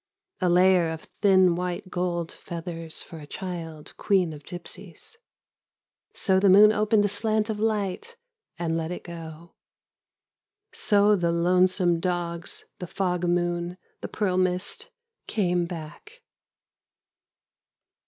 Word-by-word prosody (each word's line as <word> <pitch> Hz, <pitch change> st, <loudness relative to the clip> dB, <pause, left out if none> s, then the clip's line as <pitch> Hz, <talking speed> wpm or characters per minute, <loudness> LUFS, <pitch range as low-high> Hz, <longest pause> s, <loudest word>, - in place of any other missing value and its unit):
A 180 Hz, -, +1 dB
layer 180 Hz, -1 st, +4 dB
of 160 Hz, -1 st, -7 dB
thin 190 Hz, -3 st, +5 dB
white 180 Hz, +1 st, -4 dB
gold 175 Hz, -2 st, -2 dB
feathers 165 Hz, -1 st, -6 dB
for 165 Hz, -, -11 dB
a 145 Hz, -, -11 dB
child 165 Hz, -4 st, -7 dB
queen 185 Hz, -5 st, +1 dB
of 150 Hz, -, -10 dB
gypsies. 180 Hz, -, -9 dB, 1.0 s
So 190 Hz, -1 st, +2 dB
the 195 Hz, 0 st, +4 dB
moon 205 Hz, +3 st, +8 dB
opened 215 Hz, 0 st, +2 dB
a -, -, +3 dB
slant 215 Hz, +2 st, 0 dB
of 210 Hz, -, -5 dB
light 215 Hz, -, -2 dB, 0.4 s
and 165 Hz, -2 st, -1 dB
let 165 Hz, -1 st, -2 dB
it 180 Hz, -, -6 dB
go. 165 Hz, -1 st, -10 dB, 1.2 s
So 205 Hz, 0 st, +3 dB
the 170 Hz, -3 st, 0 dB
lonesome 180 Hz, 0 st, +3 dB
dogs, 175 Hz, -1 st, -3 dB
the 180 Hz, -, -5 dB
fog 180 Hz, -1 st, -1 dB
moon, 175 Hz, 0 st, -1 dB, 0.2 s
the -, -, -5 dB
pearl 190 Hz, -4 st, -1 dB
mist, 185 Hz, +1 st, -1 dB, 0.4 s
came 180 Hz, -4 st, 0 dB
back. 175 Hz, -, -10 dB
180 Hz, 125 wpm, -26 LUFS, 170-200 Hz, 1.2 s, moon